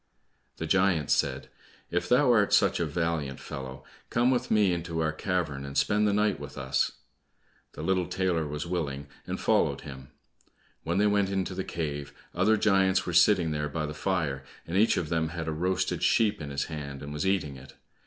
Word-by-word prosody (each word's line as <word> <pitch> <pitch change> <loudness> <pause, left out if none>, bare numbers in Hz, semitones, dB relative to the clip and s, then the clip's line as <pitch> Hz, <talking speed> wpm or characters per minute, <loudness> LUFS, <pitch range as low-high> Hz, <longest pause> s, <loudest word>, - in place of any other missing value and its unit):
The 80 - -3
giant 90 -4 +2
said, 65 -1 +1 0.4
"If 90 - -1
thou 125 +1 +5
art 105 -3 +3
such - - +4
a 85 - 0
valiant 75 -3 -2
fellow, 65 -2 -7 0.3
come 120 +2 +3
with 125 -1 0
me 105 -4 +3
into 85 -1 -3
our 80 -1 +1
cavern 80 -5 -2
and 70 0 -5
spend 105 0 +3
the - - +3
night 105 0 +1
with 70 -1 -9
us." 65 -1 0 0.8
The - - -7
little 95 -2 +1
tailor 90 -5 0
was 75 +2 -4
willing, 75 -5 -3 0.2
and - - -3
followed - - +2
him. 65 -1 -10 0.7
When 85 +2 -2
they 105 - +3
went 100 -2 +2
into 95 -1 -2
the 95 +1 -3
cave, 75 -5 -4 0.2
other 110 0 +3
giants 95 -2 +3
were 90 - -3
sitting 85 -1 +4
there 75 -1 -2
by 80 +1 -2
the 75 - -5
fire, 80 -6 -1 0.2
and 85 - -5
each 110 +4 +4
of 80 - -2
them 80 -2 0
had 80 -1 -5
a - - 0
roasted 90 +4 -1
sheep 105 -6 +2
in 75 - -5
his 70 -1 -1
hand 70 -3 -7
and 70 +1 -6
was 75 +5 -2
eating 90 -8 0
it. 65 0 -13
85 Hz, 195 wpm, -28 LUFS, 75-95 Hz, 0.8 s, thou